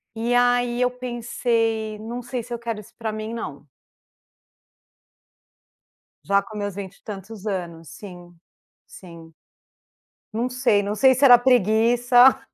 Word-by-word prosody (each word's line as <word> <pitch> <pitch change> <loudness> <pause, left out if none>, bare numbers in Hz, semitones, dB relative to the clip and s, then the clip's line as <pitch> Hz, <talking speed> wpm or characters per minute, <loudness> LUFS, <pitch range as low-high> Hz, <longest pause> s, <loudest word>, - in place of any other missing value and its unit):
E 230 +2 -1
aí 245 0 +2
eu 250 0 +2
pensei: 230 -3 -2
"Não 235 +3 -6
sei 245 0 -5
se 240 - -8
eu 235 - -4
quero 230 -2 -5
isso 225 +3 -15
pra 225 -2 -4
mim 215 +1 -6
não". 150 -10 -7 2.6
Já 200 +1 +3
com 210 +2 -11
meus 205 -2 -4
vinte 200 -1 -7
e - - -33
tantos 205 +1 -9
anos, 170 -5 -5
sim, 175 -3 -12 0.5
sim. 165 -3 -14 1.0
Não 240 +3 -1
sei, 245 -5 +2
não 205 +1 -3
sei 260 +5 +5
se 260 +3 -2
era 245 -3 +9
preguiça, 245 +1 +4
225 Hz, 140 wpm, -23 LUFS, 200-245 Hz, 2.6 s, era